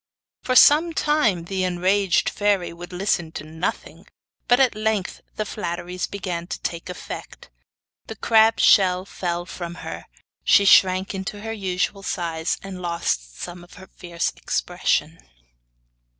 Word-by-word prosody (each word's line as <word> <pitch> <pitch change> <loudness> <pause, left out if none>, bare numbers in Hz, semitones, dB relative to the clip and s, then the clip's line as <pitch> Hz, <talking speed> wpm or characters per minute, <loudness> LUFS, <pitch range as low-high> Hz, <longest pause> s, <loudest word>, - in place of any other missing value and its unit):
For 255 - -1
some 315 +6 +6
time 245 - +1
the 190 +1 -2
enraged 185 +1 +1
fairy 205 -4 0
would 175 +1 -10
listen 180 -3 -1
to - - -6
nothing; 160 +3 -5 0.4
but 245 +1 +4
at 265 -2 +4
length 215 -3 -2
the 215 - -2
flatteries 180 -2 -4
began 175 -4 -5
to - - -5
take 170 +1 -4
effect. 180 - -9 0.6
The - - -7
crab's 225 0 +4
shell 185 -2 +5
fell 175 -3 -3
from 175 -1 -7
her, - - -7 0.4
she 200 - +5
shrank 190 0 +5
into 195 +2 -5
her 225 +1 -4
usual 195 -1 -2
size, 165 -4 -2
and 190 -2 -7
lost 170 - -2
some 175 0 -7
of 175 - -16
her 190 - -12
fierce 170 -2 -3
expression. - - -1
185 Hz, 140 wpm, -23 LUFS, 175-205 Hz, 0.6 s, some